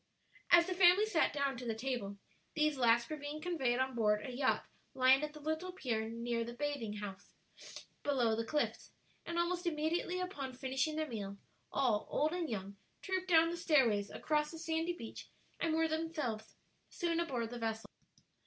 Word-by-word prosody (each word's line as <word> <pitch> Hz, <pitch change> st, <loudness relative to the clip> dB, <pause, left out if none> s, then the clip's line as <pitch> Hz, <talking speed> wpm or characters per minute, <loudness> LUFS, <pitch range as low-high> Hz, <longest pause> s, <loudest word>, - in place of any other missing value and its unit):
As 345 Hz, 0 st, +8 dB
the 370 Hz, -, -2 dB
family 365 Hz, +3 st, +6 dB
sat 350 Hz, -7 st, +2 dB
down 280 Hz, -3 st, -1 dB
to 250 Hz, -, -7 dB
the 225 Hz, -, -1 dB
table, 225 Hz, -4 st, -3 dB, 0.4 s
these 305 Hz, -1 st, +2 dB
last 235 Hz, -2 st, +4 dB
were 310 Hz, -, -4 dB
being 290 Hz, +1 st, -5 dB
conveyed 305 Hz, -8 st, 0 dB
on 260 Hz, 0 st, 0 dB
board 210 Hz, -1 st, +2 dB
a 260 Hz, -, -5 dB
yacht 260 Hz, +1 st, +1 dB, 0.3 s
lying 260 Hz, +1 st, +6 dB
at 300 Hz, 0 st, -3 dB
the 305 Hz, -, -10 dB
little 315 Hz, +4 st, -2 dB
pier 230 Hz, -11 st, -2 dB
near 235 Hz, 0 st, -2 dB
the 235 Hz, +1 st, -7 dB
bathing 255 Hz, -7 st, -3 dB
place 200 Hz, -1 st, -8 dB, 0.7 s
below 250 Hz, -6 st, +2 dB
the 230 Hz, -, -1 dB
cliffs; 295 Hz, +6 st, -1 dB, 0.4 s
and 340 Hz, -, -3 dB
almost 350 Hz, +1 st, 0 dB
immediately 335 Hz, +3 st, 0 dB
upon 290 Hz, -8 st, -4 dB
finishing 265 Hz, +4 st, -1 dB
their 310 Hz, 0 st, -1 dB
meal, 200 Hz, -5 st, -5 dB, 0.3 s
all, 245 Hz, -6 st, +1 dB
old 305 Hz, +2 st, +1 dB
and 350 Hz, -3 st, -2 dB
young, 200 Hz, -2 st, -5 dB, 0.3 s
trooped 375 Hz, -1 st, -1 dB
down 330 Hz, -1 st, +6 dB
the 345 Hz, -, -4 dB
stairways, 255 Hz, -, +3 dB
across 300 Hz, -1 st, 0 dB
the 325 Hz, -, -8 dB
sandy 325 Hz, +1 st, -1 dB
beach, 230 Hz, -10 st, -8 dB, 0.3 s
and 325 Hz, -1 st, +1 dB
were 325 Hz, 0 st, +3 dB
themselves 310 Hz, -9 st, -3 dB, 0.3 s
soon 335 Hz, -2 st, -1 dB
aboard 245 Hz, -9 st, -2 dB
the 245 Hz, -, -5 dB
vessel. 225 Hz, -1 st, -2 dB
285 Hz, 180 wpm, -35 LUFS, 235-325 Hz, 0.7 s, As